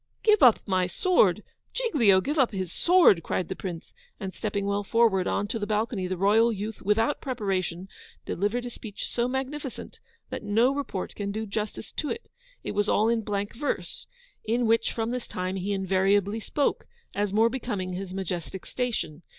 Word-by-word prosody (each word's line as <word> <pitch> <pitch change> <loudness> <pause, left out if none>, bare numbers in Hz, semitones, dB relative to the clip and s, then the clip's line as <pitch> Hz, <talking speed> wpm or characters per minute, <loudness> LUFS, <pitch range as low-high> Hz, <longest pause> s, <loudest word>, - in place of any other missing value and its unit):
'Give 430 -2 +5
up 245 -4 +7
my 185 -2 +2
sword! 215 - +3 0.3
Giglio 245 - +4
give 295 +8 -1
up 255 -3 +4
his 185 -3 -3
sword!' 345 - +5
cried 175 +1 -2
the 190 - -3
Prince; 175 -4 -7 0.3
and 190 -3 -5
stepping 200 -2 -2
well 200 0 0
forward 205 -3 +3
on 205 - 0
to 230 - -2
the 205 - -3
balcony, 215 -2 -1
the 185 0 -3
royal 215 +5 +4
youth, 215 +1 -5
WITHOUT 225 +7 +1
PREPARATION, 195 -7 -2 0.4
delivered 210 +6 -1
a 245 - -5
speech 215 -3 -6
so 240 0 0
magnificent, 265 +1 -5 0.3
that - - -4
no 225 +5 +3
report 275 -10 -4
can 200 -1 -3
do 220 +2 -3
justice 210 0 -4
to 300 - -3
it. 465 - -5 0.3
It - - -3
was 205 0 0
all 220 +2 +3
in 230 -1 +2
blank 205 -1 -3
verse 290 +5 -3 0.4
(in 235 +2 +1
which, 230 0 +2
from 225 0 -2
this 250 -1 -4
time, 185 +1 -3
he 190 +2 -2
invariably 195 +2 +2
spoke, 280 +6 -1 0.3
as 205 -1 0
more 220 +3 +4
becoming 205 -8 -3
his 185 0 -5
majestic 185 -1 -4
station). 200 -11 -3
210 Hz, 180 wpm, -27 LUFS, 190-235 Hz, 0.4 s, up